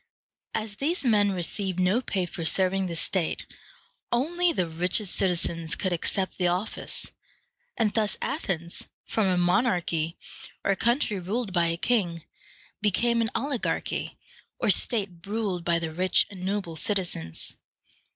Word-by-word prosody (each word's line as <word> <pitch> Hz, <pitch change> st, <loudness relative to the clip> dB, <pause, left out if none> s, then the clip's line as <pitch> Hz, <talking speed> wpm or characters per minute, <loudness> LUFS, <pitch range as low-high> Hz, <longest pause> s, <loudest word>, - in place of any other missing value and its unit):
As 215 Hz, -2 st, -3 dB
these 315 Hz, +2 st, 0 dB
men 205 Hz, -4 st, +4 dB
received 185 Hz, +1 st, -1 dB
no 185 Hz, +7 st, +3 dB
pay 190 Hz, -7 st, -1 dB
for 170 Hz, -1 st, -6 dB
serving 190 Hz, +3 st, +3 dB
the 170 Hz, -, -4 dB
state, 170 Hz, +1 st, 0 dB, 0.7 s
only 340 Hz, +8 st, +2 dB
the 185 Hz, -, 0 dB
richest 180 Hz, +4 st, 0 dB
citizens 170 Hz, -3 st, 0 dB
could 185 Hz, -2 st, 0 dB
accept 190 Hz, +3 st, 0 dB
the 180 Hz, -, +3 dB
office; 180 Hz, +5 st, -1 dB, 0.7 s
and 215 Hz, -3 st, +2 dB
thus 215 Hz, -2 st, +1 dB
Athens, 175 Hz, -, -3 dB, 0.2 s
from 220 Hz, -3 st, +1 dB
a 185 Hz, -1 st, +2 dB
monarchy, 175 Hz, -3 st, +1 dB, 0.5 s
or 195 Hz, -, +3 dB
country 235 Hz, -2 st, +1 dB
ruled 200 Hz, +3 st, -2 dB
by 170 Hz, -2 st, +3 dB
a 165 Hz, 0 st, 0 dB
king, 175 Hz, -7 st, +1 dB, 0.6 s
became 235 Hz, +3 st, +3 dB
an 225 Hz, -, +1 dB
oligarchy, 275 Hz, -4 st, -1 dB, 0.4 s
or -, -, +4 dB
state 205 Hz, -6 st, +1 dB, 0.2 s
ruled 200 Hz, -5 st, -1 dB
by 170 Hz, 0 st, +2 dB
the 165 Hz, -1 st, -3 dB
rich 185 Hz, +3 st, +3 dB
and 185 Hz, -2 st, -8 dB
noble 190 Hz, -3 st, -2 dB
citizens. 165 Hz, -, -1 dB
190 Hz, 140 wpm, -27 LUFS, 175-220 Hz, 0.7 s, men